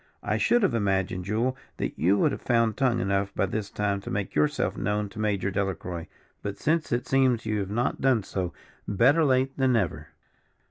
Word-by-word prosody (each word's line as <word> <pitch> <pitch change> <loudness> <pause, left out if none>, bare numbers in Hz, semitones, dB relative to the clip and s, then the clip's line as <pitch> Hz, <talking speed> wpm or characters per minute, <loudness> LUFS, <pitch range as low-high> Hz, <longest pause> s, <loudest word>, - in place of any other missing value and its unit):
I - - 0
should 240 -2 +3
have 195 - +2
imagined, 95 -4 0
Jule, 115 +6 0 0.2
that - - -2
you 95 +5 +3
would - - +3
have - - -5
found 115 -3 +2
tongue 125 -3 +1
enough 100 -1 0
by - - +2
this 100 +1 -3
time 100 -1 -1
to - - -7
make 100 -1 -3
yourself 75 0 +1
known 105 +1 -1
to 110 - -10
Major 100 -2 0
Delacroix, 90 -3 -3 0.3
but 100 0 -4
since 160 +1 0
it 120 +1 0
seems 130 -4 +2
you 105 -1 0
have 95 -1 -3
not 120 +4 -1
done 130 -5 +3
so, 95 -2 -3 0.4
better 130 - +4
late 130 -1 +2
than 130 -2 +3
never. 110 -7 -1
105 Hz, 195 wpm, -27 LUFS, 100-125 Hz, 0.4 s, better